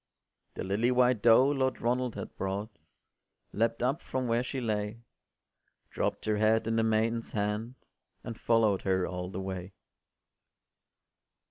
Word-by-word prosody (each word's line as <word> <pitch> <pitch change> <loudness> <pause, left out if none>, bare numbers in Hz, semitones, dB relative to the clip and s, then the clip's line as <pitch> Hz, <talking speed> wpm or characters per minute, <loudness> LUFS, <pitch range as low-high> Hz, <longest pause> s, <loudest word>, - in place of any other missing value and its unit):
The - - -4
lily 100 +6 +1
white 125 -3 +3
doe 120 +3 +6
Lord 130 -2 0
Ronald 125 0 0
had - - -7
brought 100 +3 -4 0.8
Leapt 115 +2 0
up 135 +6 0
from 130 -1 -3
where 115 +1 +2
she 130 +1 -4
lay, 110 -1 -3 0.9
Dropt - - -2
her 110 -1 +1
head 110 +1 +3
in 115 0 0
the - - +4
maiden’s 115 +1 0
hand, 105 +4 -2 0.5
And 115 - -6
follow’d 110 -4 +2
her 95 -1 +1
all 90 -1 -4
the 95 - -5
way. 95 0 -6
115 Hz, 140 wpm, -30 LUFS, 105-120 Hz, 0.9 s, doe